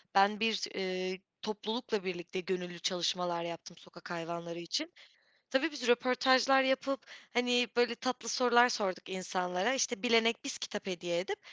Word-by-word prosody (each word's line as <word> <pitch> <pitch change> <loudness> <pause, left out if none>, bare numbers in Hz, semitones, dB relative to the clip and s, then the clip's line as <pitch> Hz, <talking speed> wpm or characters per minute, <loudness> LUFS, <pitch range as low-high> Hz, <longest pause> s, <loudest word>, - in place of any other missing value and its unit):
Ben 200 +2 +5
bir, 220 -3 0
eee, 185 0 -2 0.2
toplulukla 215 0 -3
birlikte 185 0 -4
gönüllü 180 -2 -4
çalışmalar 175 -1 0
yaptım 170 +1 -8
sokak 175 +1 -13
hayvanları 170 0 -5
için. 305 - -3 0.6
Tabii, 295 +5 +2
biz 265 -5 -4
röportajlar 260 +2 +4
yapıp, 265 -1 0 0.3
hani, 245 0 +3
böyle 240 0 +3
tatlı 245 -2 -3
sorular 245 0 +5
sorduk 190 -6 -2
insanlara. 185 +4 -1
İşte, 240 -4 0
bilene 230 -1 +5
biz 280 - -4
kitap 210 -2 -5
hediye 175 -2 -2
edip 405 - -4
210 Hz, 140 wpm, -32 LUFS, 180-245 Hz, 0.6 s, Ben